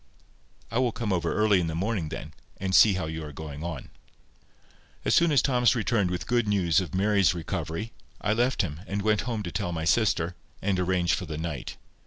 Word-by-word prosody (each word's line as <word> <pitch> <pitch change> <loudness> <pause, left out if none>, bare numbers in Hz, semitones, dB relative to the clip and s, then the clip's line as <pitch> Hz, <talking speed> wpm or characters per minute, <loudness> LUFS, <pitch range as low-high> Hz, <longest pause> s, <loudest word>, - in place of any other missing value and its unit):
"I 115 - +1
will 125 -2 +2
come 110 -3 -2
over 90 - 0
early 105 -3 +3
in 85 - -1
the 80 - -3
morning 95 -2 -1
then, - - -7 0.2
and 95 0 -3
see 105 +2 +7
how 95 -3 -2
you 80 0 -5
are 75 - -7
going 75 0 -7
on." 85 -6 -6 1.1
As - - +2
soon 170 -1 +4
as 140 -4 +4
Thomas 125 -4 +3
returned 110 -5 +1
with 90 -2 -3
good 120 +2 +1
news 90 -6 +3
of 90 -2 -5
Mary's 100 -2 +3
recovery, 85 +5 -4 0.3
I 105 - +1
left 120 +1 +1
him, 75 -4 -5
and 100 0 -2
went 105 0 +2
home 110 -3 -2
to 85 - -5
tell 85 +2 -2
my 80 -1 -3
sister, 85 -1 +2 0.3
and 95 -2 0
arrange 90 -2 +1
for - - -2
the 75 -1 -5
night. 80 -5 -5
95 Hz, 210 wpm, -27 LUFS, 80-110 Hz, 1.1 s, see